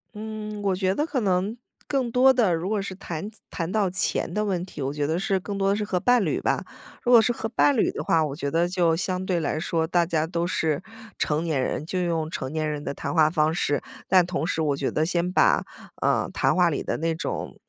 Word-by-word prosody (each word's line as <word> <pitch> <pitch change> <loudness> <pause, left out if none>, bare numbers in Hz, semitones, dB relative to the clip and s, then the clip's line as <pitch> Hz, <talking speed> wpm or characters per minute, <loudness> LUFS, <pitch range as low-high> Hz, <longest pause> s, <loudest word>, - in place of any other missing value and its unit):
嗯， 215 -1 -6
我 195 -2 +1
觉 190 0 0
得 300 - +1
可 290 -5 -1
能 195 0 0 0.3
更 260 -4 0
多 260 +2 +6
的 225 -8 +3
如 165 +3 -3
果 210 0 0
是 195 -1 -6
谈 180 0 -5 0.2
谈 165 0 -3
到 205 -1 +2
钱 190 - 0
的 210 - 0
问 190 -4 -1
题， 180 - -9
我 135 0 -1
觉 145 0 -2
得 160 +4 0
是 195 0 0
更 200 +2 -5
多 195 0 +1
的 200 - +3
是 210 - -2
和 190 -3 -1
伴 245 +2 +3
侣 - - -1
吧。 - - 0 0.4
如 245 - +1
果 235 -2 +9
是 225 - +2
和 225 -1 -3
伴 265 +4 +3
侣 - - +2
的 - - -5
话 160 -1 +3
我 140 -2 -4
觉 140 -2 -3
得 165 +4 +2
就 175 -2 +2
相 185 +1 -2
对 185 -2 0
来 155 0 -1
说， 160 0 0
大 175 +1 +2
家 160 -2 +1
都 170 +1 -2
是 160 -3 0 0.4
成 150 +1 0
年 155 -5 0
人， 135 - -2
就 185 +3 -2
用 165 -3 -1
成 130 - -4
年 155 0 -1
人 150 -1 -4
的 - - -3
谈 - - -4
话 155 -2 +5
方 155 -1 +2
式， 145 -4 0 0.2
但 185 -2 +5
同 175 -3 -2
时 160 -3 0
我 145 -2 +1
觉 - - -1
得 155 - 0
先 175 +1 0
把， - - +4 0.4
呃， - - +2
谈 - - +2
话 180 -2 +4
里 145 - -2
的 - - -2
那 165 +1 0
种， 160 - -5
180 Hz, 270 characters per minute, -25 LUFS, 160-205 Hz, 0.4 s, 果